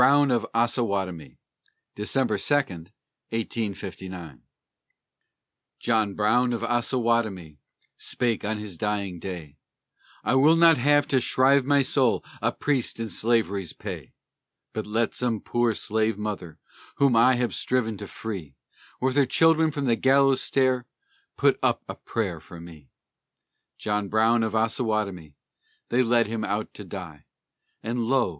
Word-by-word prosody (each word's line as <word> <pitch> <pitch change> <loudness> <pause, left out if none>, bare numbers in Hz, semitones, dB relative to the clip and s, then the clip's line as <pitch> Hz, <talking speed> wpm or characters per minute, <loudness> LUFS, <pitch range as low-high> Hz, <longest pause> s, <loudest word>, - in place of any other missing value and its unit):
BROWN 140 +2 +5
OF 115 -2 +1
OSSAWATOMIE 100 - -1 0.6
[December 110 0 -1
2, 145 - 0
1859] 95 - -5 1.4
John 110 -4 +1
Brown 120 +4 +2
of 115 - -3
Ossawatomie 115 - 0 0.4
spake 120 -4 -2
on 110 +1 -1
his 105 -6 -8
dying 100 -4 -2
day: 80 -6 -7 0.7
"I - - +1
will 145 +5 +5
not 165 -3 +6
have 145 +2 +3
to 130 -3 +3
shrive 135 +2 +3
my 140 0 +3
soul 130 -2 +1 0.2
a - - +1
priest 135 -6 -1
in 115 -1 -3
Slavery's 105 -6 0
pay. - - -8 0.6
But - - -4
let 110 +2 0
some 120 -3 -1
poor 120 0 0
slave 110 0 0
mother 100 -6 -5 0.4
whom 140 -4 +3
I 125 +3 +5
have 120 -1 -1
striven 120 -4 0
to 105 - -7
free, 95 -13 -7 0.4
With 130 0 0
her 140 -2 +4
children, 160 +3 +4
from 145 -2 -3
the 120 -3 +3
gallows 135 +2 +3
stair 130 -2 +1 0.5
put - - +3
up - - +1
a - - -5
prayer 95 -8 -3
for 85 +2 -12
me!" 80 -5 -13 0.9
John 105 -1 -1
Brown 115 +2 +3
of 110 -1 -1
Ossawatomie, 110 - -1 0.5
they 125 - +3
led 120 -1 +3
him 110 0 -4
out 105 0 -2
to 105 - -8
die; 85 -6 -9 0.6
And 120 +1 -2
lo! 130 -3 +2
115 Hz, 135 wpm, -25 LUFS, 100-125 Hz, 1.4 s, not